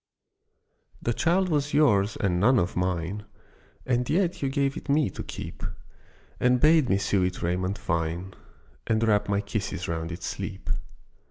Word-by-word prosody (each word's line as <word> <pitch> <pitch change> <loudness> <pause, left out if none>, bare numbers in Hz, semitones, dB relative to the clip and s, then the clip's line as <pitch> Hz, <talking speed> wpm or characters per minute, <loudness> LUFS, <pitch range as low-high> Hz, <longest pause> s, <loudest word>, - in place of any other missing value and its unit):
THE 120 - +1
child 175 +9 +2
was 145 -2 0
yours 105 -9 +4
and 90 -3 +1
none 125 +7 +5
of 90 -3 0
mine, 90 +2 -1 0.6
And 125 -1 0
yet 175 0 +1
you 135 - +1
gave 140 0 0
it - - -8
me 140 -7 +3
to - - -7
keep, - - -7 0.8
And 125 0 +3
bade 155 -1 +5
me 95 - +4
sew 100 -1 +1
it 90 0 -1
raiment 90 +3 0
fine, 85 +3 -2 0.5
And 115 0 +2
wrap 105 -1 +2
my 100 0 +2
kisses 100 -3 -3
round 80 0 -3
its 85 +1 -6
sleep. - - -4
105 Hz, 160 wpm, -27 LUFS, 90-135 Hz, 0.8 s, none